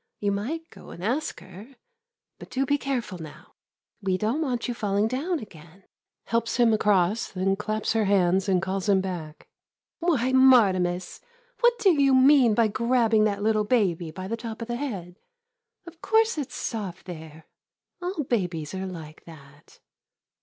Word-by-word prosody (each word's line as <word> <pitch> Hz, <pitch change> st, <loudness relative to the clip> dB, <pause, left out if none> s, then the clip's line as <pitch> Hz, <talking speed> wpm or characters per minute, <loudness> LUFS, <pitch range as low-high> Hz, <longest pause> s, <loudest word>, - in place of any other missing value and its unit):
You 205 Hz, -1 st, 0 dB
might 285 Hz, +12 st, -3 dB
go -, -, -14 dB
and 175 Hz, -, -10 dB
ask 255 Hz, +9 st, -2 dB
her. 205 Hz, +9 st, -13 dB, 0.6 s
But -, -, -11 dB
do 270 Hz, +1 st, -1 dB
be 285 Hz, +2 st, +1 dB
careful 240 Hz, -10 st, -3 dB
now. 155 Hz, -2 st, -12 dB, 0.5 s
We 190 Hz, -2 st, 0 dB
don't 225 Hz, +10 st, -1 dB
want 250 Hz, -6 st, -2 dB
you 245 Hz, -, -2 dB
falling 205 Hz, -2 st, 0 dB
down 295 Hz, +9 st, -1 dB
again. 180 Hz, -, -13 dB, 0.4 s
[Helps 230 Hz, 0 st, -1 dB
him 235 Hz, -2 st, +4 dB
across, 210 Hz, 0 st, +1 dB
then 195 Hz, +1 st, 0 dB
claps 215 Hz, +2 st, -2 dB
her 220 Hz, -2 st, +1 dB
hands 190 Hz, -1 st, +2 dB
and 185 Hz, -1 st, +2 dB
calls 195 Hz, +1 st, -2 dB
him 195 Hz, -1 st, +4 dB
back.] 175 Hz, -5 st, -6 dB, 0.5 s
Why, 290 Hz, -8 st, +1 dB
Martimas, 190 Hz, -9 st, +3 dB, 0.4 s
what 480 Hz, 0 st, +4 dB
do 395 Hz, -4 st, +4 dB
you 275 Hz, -1 st, +4 dB
mean 260 Hz, -4 st, +5 dB
by 230 Hz, 0 st, +4 dB
grabbing 230 Hz, 0 st, +2 dB
that 205 Hz, -1 st, -1 dB
little 215 Hz, 0 st, +2 dB
baby 190 Hz, -8 st, +1 dB
by 185 Hz, +4 st, -7 dB
the 225 Hz, -, -2 dB
top 230 Hz, -1 st, -7 dB
of -, -, -8 dB
the 240 Hz, 0 st, -3 dB
head? 195 Hz, -10 st, -6 dB, 0.7 s
Of 335 Hz, -1 st, -13 dB
course 445 Hz, +1 st, +2 dB
it 290 Hz, -5 st, -4 dB
's -, -, -9 dB
soft 200 Hz, -6 st, -5 dB
there 160 Hz, -3 st, -10 dB, 0.3 s
— -, -, -54 dB
all 355 Hz, -3 st, -3 dB
babies 180 Hz, -, -2 dB
are 190 Hz, 0 st, -4 dB
like 160 Hz, -4 st, -10 dB
that. 145 Hz, -3 st, -16 dB
215 Hz, 170 wpm, -25 LUFS, 185-255 Hz, 0.7 s, mean